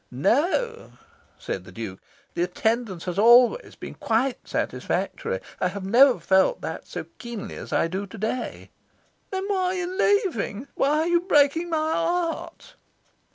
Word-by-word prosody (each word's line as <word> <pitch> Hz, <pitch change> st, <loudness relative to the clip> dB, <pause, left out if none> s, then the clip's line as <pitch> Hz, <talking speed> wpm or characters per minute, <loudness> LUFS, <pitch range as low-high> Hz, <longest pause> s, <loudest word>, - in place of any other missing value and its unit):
"No," 345 Hz, -, 0 dB, 0.4 s
said -, -, -5 dB
the -, -, -13 dB
Duke, 110 Hz, -5 st, -7 dB, 0.3 s
"the 170 Hz, -, -2 dB
attendance 200 Hz, +1 st, -1 dB
has 180 Hz, +1 st, -2 dB
always 240 Hz, -, +5 dB
been -, -, -8 dB
quite 240 Hz, +3 st, -1 dB
satisfactory. 485 Hz, +2 st, -2 dB, 0.2 s
I -, -, +2 dB
have 190 Hz, +1 st, -5 dB
never 250 Hz, +6 st, +6 dB
felt 190 Hz, -, +3 dB
that -, -, -6 dB
so -, -, -5 dB, 0.2 s
keenly 235 Hz, -4 st, -6 dB
as -, -, -9 dB
I -, -, +2 dB
do 190 Hz, +4 st, -4 dB
to 210 Hz, -, -11 dB
day." 220 Hz, +4 st, -4 dB, 0.6 s
"Then 380 Hz, 0 st, -3 dB
why 395 Hz, -2 st, 0 dB
are 365 Hz, 0 st, +1 dB
you 360 Hz, -1 st, -2 dB
leaving? 365 Hz, -, +1 dB
Why 295 Hz, +3 st, +2 dB
are 325 Hz, -, 0 dB
you 345 Hz, 0 st, +3 dB
breaking 330 Hz, -1 st, +3 dB
my 315 Hz, -1 st, 0 dB
heart?" 345 Hz, +9 st, -2 dB
270 Hz, 155 wpm, -25 LUFS, -, 0.6 s, never